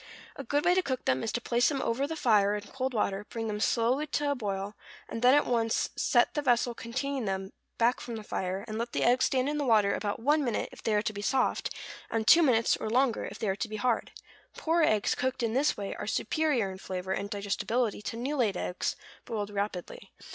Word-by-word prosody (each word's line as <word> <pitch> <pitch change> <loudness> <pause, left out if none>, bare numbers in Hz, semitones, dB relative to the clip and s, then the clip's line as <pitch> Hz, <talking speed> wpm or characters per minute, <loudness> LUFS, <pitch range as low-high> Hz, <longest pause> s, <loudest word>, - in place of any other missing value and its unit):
A - - -6
good 290 +1 0
way 355 - +5
to 375 - +3
cook 260 -7 -3
them 130 0 +2
is - - -2
to - - 0
place 240 0 +2
them 280 -3 -1
over 260 +2 0
the 320 - -4
fire 210 -7 +3
in 210 - -3
cold 260 +5 -3
water, 205 -3 -1
bring 225 -1 -4
them 210 -1 -3
slowly 245 +7 +1
to 290 -1 0
a - - +3
boil, 200 -5 -3 0.3
and 230 - -5
then 250 +2 +6
at 290 - +4
once 230 -2 0
set - - +3
the 295 - 0
vessel 245 -3 +2
containing 260 +2 -3
them 190 0 -3 0.2
back 240 +2 +2
from 235 - -6
the 220 - -6
fire, 190 0 -3
and 215 0 -4
let 235 +1 -3
the - - 0
eggs 250 +2 +4
stand 260 0 +1
in 295 +1 -1
the - - 0
water 215 -6 +4
about 205 -1 -2
one 295 +5 +2
minute 240 -5 -1
if - - -13
they 220 - +1
are 210 - +2
to 215 - -2
be 205 - -6
soft, 255 +5 +1 0.4
and 220 -1 -1
two 340 - +8
minutes, 235 -7 +3
or - - -4
longer, 250 0 +2
if - - -7
they 220 - -3
are 190 - +1
to 225 - -3
be 215 - -5
hard. 230 +2 0 0.5
Poor 335 +1 +1
eggs 215 -9 +3
cooked 260 -1 -2
in 225 -1 0
this 280 +4 +2
way 200 -1 -4
are - - -6
superior 240 -2 0
in 190 - -9
flavor 185 0 -5
and 200 +1 -2
digestibility 205 +3 -1
to 225 - -5
new 265 +5 -2
laid 220 -9 +1
eggs 180 - -2 0.3
boiled 210 -2 -3
rapidly. 200 -3 -4
230 Hz, 240 wpm, -29 LUFS, 205-260 Hz, 0.5 s, two